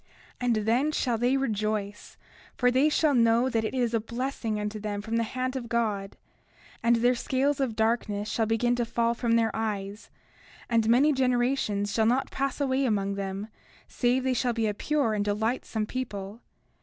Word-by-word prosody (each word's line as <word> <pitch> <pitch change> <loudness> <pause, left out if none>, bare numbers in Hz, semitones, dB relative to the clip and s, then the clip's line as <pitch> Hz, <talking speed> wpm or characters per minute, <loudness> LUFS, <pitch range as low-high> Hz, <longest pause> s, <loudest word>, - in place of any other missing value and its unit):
30:6 - - -38 0.4
And 235 - +3
then 255 +7 +2
shall 245 -6 0
they 250 +3 +2
rejoice; 215 -5 -3 0.4
for 250 -1 +3
they 265 +4 +3
shall 305 -1 +2
know 235 +1 +3
that 225 -3 0
it 220 - -3
is 240 -2 0
a 230 - +2
blessing 235 -1 -3
unto 210 +1 -4
them 205 -1 -3
from 225 +2 -2
the - - +2
hand 255 +3 -3
of 240 -3 -5
God; 210 -4 -1 0.6
and 235 0 +4
their 240 +2 +3
scales 270 +3 0
of 255 -5 -1
darkness 220 -2 0
shall 225 0 0
begin 240 +2 +1
to 240 - +1
fall 235 0 0
from 235 -1 0
their 230 -1 +2
eyes; 210 -1 -4 0.6
and 225 -2 +2
many 275 +6 +5
generations 245 -5 0
shall 220 -1 +2
not 255 +4 +1
pass 275 0 -2
away 270 -1 +1
among 200 -5 0
them, 195 +1 -4 0.4
save 250 +1 +1
they 260 0 +1
shall 245 0 0
be 225 -1 0
a 210 - 0
pure 280 0 0
and 205 -1 0
delightsome 220 +1 -1
people. 210 -3 -5
230 Hz, 185 wpm, -27 LUFS, 215-255 Hz, 0.6 s, many